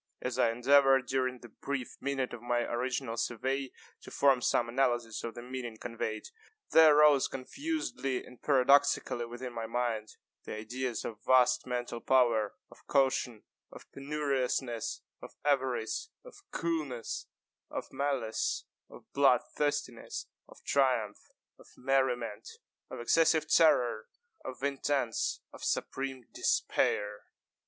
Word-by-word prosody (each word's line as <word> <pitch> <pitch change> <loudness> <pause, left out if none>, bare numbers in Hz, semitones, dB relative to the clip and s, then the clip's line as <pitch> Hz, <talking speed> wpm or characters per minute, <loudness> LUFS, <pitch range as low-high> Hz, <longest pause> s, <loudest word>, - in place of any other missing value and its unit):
As - - -3
I 115 - +4
endeavored, 135 +2 +4
during 130 0 -1
the 120 - -12
brief 135 +3 -5
minute 135 -2 -2
of 115 - -7
my 120 0 0
original 120 0 -2
survey, 130 +4 -2 0.3
to - - -11
form 135 -3 +3
some 120 0 +2
analysis 120 -2 0
of 115 - -5
the 120 - -8
meaning 125 -3 -6
conveyed, 110 -2 -4 0.5
there 155 -2 +7
arose 150 -3 +6
confusedly 135 - -3
and 125 - -15
paradoxically 135 -3 +3
within 120 +1 -7
my 115 -1 -4
mind, 115 -2 -2 0.3
the - - -6
ideas 120 +2 -4
of 105 -2 -7
vast 130 -1 +4
mental 120 -1 -3
power, 120 -5 +3 0.2
of - - -17
caution, 130 -4 +1 0.3
of - - -12
penuriousness, 135 -4 -2 0.2
of - - -11
avarice, 130 - 0 0.2
of - - -12
coolness, 155 -8 -3 0.4
of - - -6
malice, 135 -6 -1 0.2
of - - -14
blood 135 -3 +5
thirstiness, 145 -5 -2 0.2
of - - -17
triumph, 125 -7 +1 0.3
of - - -17
merriment, 125 -5 0 0.4
of - - -7
excessive 160 +4 +3
terror, 125 -9 +4 0.4
of 130 +1 -8
intense 140 -3 -1
of - - -11
supreme 135 -2 -2
despair. 105 0 0
130 Hz, 125 wpm, -31 LUFS, 120-140 Hz, 0.5 s, there